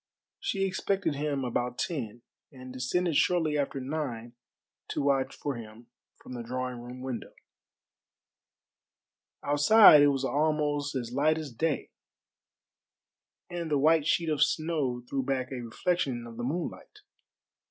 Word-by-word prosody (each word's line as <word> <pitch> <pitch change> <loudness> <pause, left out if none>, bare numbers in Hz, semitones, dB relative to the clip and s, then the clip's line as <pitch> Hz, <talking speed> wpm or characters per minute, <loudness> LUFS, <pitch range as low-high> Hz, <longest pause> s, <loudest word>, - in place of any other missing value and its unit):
She 195 -1 -1
expected 195 -2 -1
him 145 -2 -2
about 125 0 -2
ten, 120 -8 -4 0.3
and 130 -2 -11
descended 160 +7 -1
shortly 165 -4 +2
after 140 -1 -1
nine 130 -4 -4 0.5
to - - -2
watch 135 -1 +1
for 145 - -3
him 115 +1 -12 0.2
from - - -12
the 120 - -5
drawing 125 +1 -4
room 125 +1 -9
window. 130 -2 -6 2.1
Outside 150 +3 +7
it 145 - +6
was 135 -1 +1
almost 145 -1 0
as 120 -2 -3
light 155 +4 +2
as 155 -4 -5
day, 150 +6 -2 1.6
and 175 -2 -5
the 150 - +2
white 155 +1 +3
sheet 165 0 +1
of 150 -2 0
snow 145 -5 0
threw 135 +1 -1
back 130 -1 -2
a 130 -2 -4
reflection 120 +1 -1
of 115 -1 -10
the 120 - -4
moonlight. 160 +7 -5
140 Hz, 135 wpm, -29 LUFS, 125-155 Hz, 2.1 s, Outside